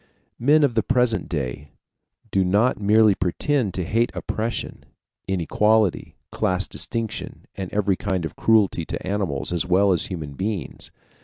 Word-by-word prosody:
Men 150 +5 +4
of 140 -4 +2
the 110 - +2
present 125 -3 +1
day 70 -1 -4 0.6
do 95 - +2
not 105 +6 +2
merely 105 +1 +5
pretend 105 - -1
to 90 - -1
hate 115 +7 +1
oppression, 115 +2 -4 0.4
inequality, 105 +2 +1 0.2
class 95 +1 0
distinction, 115 -2 -4
and 95 -2 -6
every 100 -2 +1
kind 95 -4 -2
of - - -6
cruelty 105 -6 +2
to - - -6
animals 95 -7 -2
as 85 0 -1
well 95 +2 +4
as 85 - -1
human 80 -6 -6
beings. 95 - -4
100 Hz, 145 wpm, -23 LUFS, 90-110 Hz, 0.6 s, merely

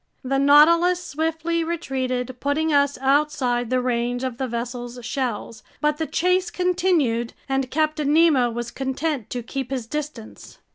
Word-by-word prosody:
The 270 +1 0
Nautilus 335 +6 +5
swiftly 325 +2 -1
retreated, 260 -6 -3
putting 305 +2 0
us 285 0 +3
outside 265 -4 +1
the 255 0 +2
range 245 0 -1
of 255 -2 -4
the 265 - -1
vessel's 240 +1 -5
shells. 240 -4 -3 0.2
But 300 0 +1
the 320 - -1
chase 365 +1 +1
continued, 350 -11 +1
and 270 -1 -1
Captain 305 0 0
Nemo 300 -6 +4
was 235 0 -5
content 270 -1 -3
to 245 -1 -4
keep 265 +1 -5
his 260 -4 -3
distance. 290 -4 -7
275 Hz, 145 wpm, -23 LUFS, 245-315 Hz, 0.2 s, Nautilus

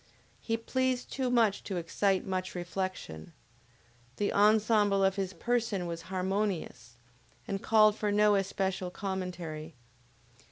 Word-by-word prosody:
He 225 -1 -1
pleased 255 +2 -1
too 260 -2 -1
much 230 -5 +2
to 190 - -3
excite 190 +3 0
much 185 -1 -3
reflection. 175 - -5 0.8
The 205 - -1
ensemble 210 -1 +4
of 195 0 +3
his 195 -2 -2
person 225 -1 -1
was 170 -1 -4
harmonious, 185 - -2 0.5
and 195 -1 -3
called 215 -1 +5
for 210 -1 -1
no 210 0 +4
especial 190 -1 -1
commentary. 180 -5 -5
195 Hz, 120 wpm, -30 LUFS, 180-215 Hz, 0.8 s, called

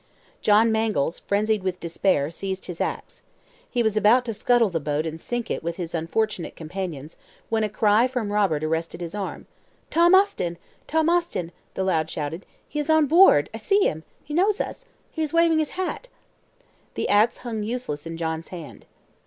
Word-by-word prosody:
John 220 +2 +4
Mangles, 215 -8 0
frenzied 210 +1 0
with 185 -1 -3
despair, 165 -3 0
seized 190 +2 -5
his 175 -2 -6
ax. - - -4 0.5
He 240 -2 0
was 220 -2 +1
about 225 +4 +4
to 230 - -3
scuttle 235 -1 +2
the 165 - -1
boat 150 +1 -1
and 160 0 -5
sink 240 -1 -3
it - - -2
with 170 +1 -3
his 170 -2 -5
unfortunate 175 +3 -2
companions, 165 -3 -6 0.3
when 225 -1 +1
a 215 - 0
cry 215 +3 +3
from 245 -5 -3
Robert 190 -8 +1
arrested 160 +2 -2
his 170 0 -6
arm. 205 -2 -5 0.5
"Tom 345 +3 +6
Austin! 185 - +2 0.3
Tom 320 0 +1
Austin!" 340 - 0 0.2
the 190 - -1
lad 160 -4 +1
shouted. 160 +5 -5 0.2
"He 300 - -4
is 295 +1 -3
on 315 -1 +5
board! 300 - +6
I - - -4
see 400 - +2
him! 160 +1 -1 0.2
He 295 - -8
knows 390 +5 +2
us! - - -4 0.3
He 320 - -4
is 310 -1 -2
waving 335 -1 +4
his 310 +3 -2
hat." 375 +6 -3 0.9
The - - -1
ax 215 +3 +3
hung 225 -3 -3
useless 210 -10 -4
in 165 0 -6
John's 160 0 -3
hand. 170 -5 -10
205 Hz, 185 wpm, -24 LUFS, 165-245 Hz, 0.9 s, Tom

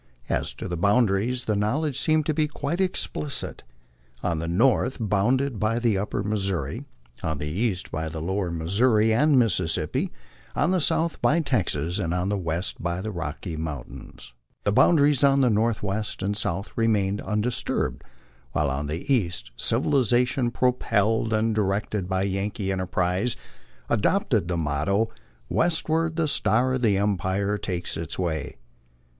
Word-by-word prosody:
^3, - - -1
to - - -6
the 90 - -3
boundary 100 +4 +2
the 120 -4 -1
knowledge 130 +8 0
seemed 155 +1 +2
to 155 - +1
be 155 0 +1
quite 150 +4 -3
explicit: 150 -6 -1 0.6
on 85 -3 0
the 80 - -3
north 125 +8 +2
bounded 115 +4 +1
by 110 +2 +1
the 115 -3 +1
Upper 100 +1 -2
Missouri, 95 -9 -2 0.4
on 80 -2 -2
the 75 - -4
east 95 +3 -2
by 80 0 -3
the 80 0 -6
Lower 95 +3 -1
Missouri 105 +7 +2
and 145 +4 +4
Mississippi, 95 -9 +1 0.4
on 175 - +2
the 185 -2 +2
south 165 +2 +1
by 165 - +3
Texas, 95 - 0
and 85 -2 -1
on 90 +2 -1
the 100 - 0
west 85 +1 -2
by 85 +1 -2
the 110 +3 -4
Rocky 85 -2 -5
Mountains. 70 -4 -7 0.3
The 100 - +1
boundaries 145 +3 +4
on 140 0 +5
the 125 -3 +4
northwest 105 -2 -1
and 100 +1 0
south 100 -2 -1
remained 105 -3 +1
undisturbed, 110 +3 -1 0.5
while 75 -2 +1
on 70 +2 -2
the 85 - -1
east 85 - -1
civiliza 125 - +3
tion, 125 -1 -1
propelled 115 -3 +1
and 110 +1 +1
directed 100 -2 -1
by 95 0 +1
Yankee 100 +1 -2
enterprise, 95 +4 0 0.5
adopted 85 - +1
the 90 -1 -1
motto, 80 +8 0 0.4
West 165 - +1
ward 160 0 +1
the 165 -2 +1
star 130 -2 +2
of 130 -1 -2
empire 100 -1 +1
takes 90 -2 -3
its 80 -1 -4
way." 80 -5 -2
105 Hz, 150 wpm, -25 LUFS, 90-125 Hz, 0.6 s, on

